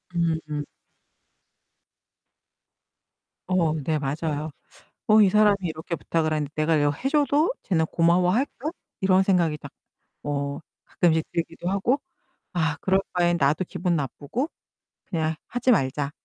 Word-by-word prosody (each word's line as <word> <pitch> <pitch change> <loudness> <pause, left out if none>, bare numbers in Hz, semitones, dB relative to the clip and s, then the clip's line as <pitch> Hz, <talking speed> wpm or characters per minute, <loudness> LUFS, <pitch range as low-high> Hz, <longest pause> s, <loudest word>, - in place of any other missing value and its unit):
음음. 160 -3 -1 2.8
어 175 -4 +2
네, 155 +1 -1
맞아요. 150 +2 -2 0.6
'어 215 0 +6
이 195 - +6
사람이 210 -1 +5
이렇게 160 0 -4
부탁을 160 -1 -1
하는데 150 -2 -1
내가 155 +1 +2
이거 145 -1 +3
해 255 - -2
줘도 295 - +3
쟤는 160 -5 +1
고마워할까?' 180 - +1 0.3
이런 190 0 +4
생각이 175 -5 +2
딱 140 - -11 0.5
뭐 140 0 -3 0.2
가끔씩 160 -3 +2
들기도 170 +1 -3
하고. 235 +9 +1 0.5
'아, 160 -4 0
그럴 190 0 +3
바엔 175 -1 +3
나도 150 +5 +2
기분 175 0 -1
나쁘고 150 - -3 0.6
그냥 160 -3 -1
하지 245 +1 +1
말자.' 140 - +1
165 Hz, 250 characters per minute, -25 LUFS, 155-190 Hz, 2.8 s, 어